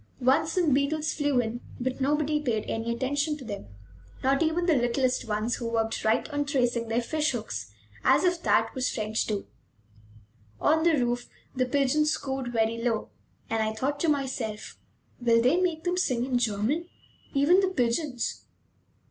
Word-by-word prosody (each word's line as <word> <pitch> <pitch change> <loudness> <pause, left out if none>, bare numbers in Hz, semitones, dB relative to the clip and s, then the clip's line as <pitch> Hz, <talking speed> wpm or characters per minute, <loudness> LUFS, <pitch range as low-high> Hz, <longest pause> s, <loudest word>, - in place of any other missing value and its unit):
Once 265 +5 +2
some 345 -6 +2
beetles 300 +3 +1
flew 290 -4 +1
in; 235 +1 -2 0.2
but 260 +2 -3
nobody 300 +2 +1
paid 230 -7 -1
any 225 +1 -2
attention 285 +5 -1
to 270 - -10
them, 200 - -6 0.6
not 275 +2 +2
even 330 +2 +1
the 340 - +4
littlest 250 -1 +1
ones, 215 +2 -1
who 235 - -3
worked 225 -1 -1
right 220 +1 +2
on 290 0 0
tracing 245 -5 0
their 230 +2 0
fish 305 +2 0
hooks, 115 - -5 0.3
as - - +4
if 355 -2 +1
that - - +2
was 260 -2 0
French, 215 0 -1
too. 205 -2 -2 1.1
On 315 +1 +3
the 330 -2 +4
roof 245 -1 -1 0.3
the 255 -1 +1
pigeons 290 +3 +2
cooed 265 -2 -4
very 225 0 +1
low, 230 -2 -1 0.4
and 225 0 0
I 220 0 0
thought 280 +5 -1
to 330 - +1
myself: 260 -7 -2 0.4
"Will 235 -1 +4
they 255 +10 +3
make 335 -3 0
them 355 0 0
sing 250 -9 +1
in 255 -2 +1
German, 240 - 0 0.5
even 295 +7 +5
the 380 -1 +2
pigeons?" 250 -3 -1
260 Hz, 170 wpm, -27 LUFS, 230-300 Hz, 1.1 s, even